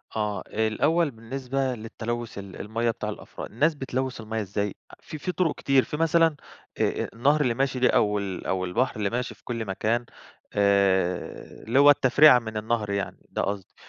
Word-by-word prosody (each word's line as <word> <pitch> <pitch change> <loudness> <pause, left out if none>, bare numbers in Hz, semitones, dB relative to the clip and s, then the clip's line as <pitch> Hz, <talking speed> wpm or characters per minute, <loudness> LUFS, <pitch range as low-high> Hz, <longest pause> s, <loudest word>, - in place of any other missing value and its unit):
آه، 105 -3 -2
الأول 145 +9 +1
بالنسبة 130 +3 -3
للتلوث 115 0 -5
ال 100 -2 -8
المَيَّة 115 +3 -1
بتاع - - -5
الأفراد، - - -8
الناس 150 +8 +2
بتلوث 130 -2 -3
المَيَّة 110 0 -3
إزاي؟ 100 0 -3 0.2
آ - - -21
في 155 - -8
في 165 +5 -3
طرق 180 -4 0
كتير، 135 -2 +3
في 150 - -5
مثلًا 165 -1 +3 0.4
آآ، - - +1 0.2
آآ، - - -5
النهر 145 +6 +2
اللي 125 -5 +2
ماشي 135 +1 -1
ده 125 - +4
أو 105 -1 +2
ال 95 -2 -5
أو 95 -1 -1
البحر 115 +9 0
اللي 105 -2 -1
ماشي 125 +2 -3
في - - -29
كل 115 -2 -4
مكان، 110 +5 -1 0.5
آآ، 100 -3 +1
اللي 125 +4 +3
هو 145 +1 +8
التفريعة 145 0 +7
من 110 -2 -6
النهر 110 -1 -1
يعني 100 -1 -4
ده - - -2
قصدي. 100 -2 -4
115 Hz, 185 wpm, -26 LUFS, 105-135 Hz, 0.5 s, هو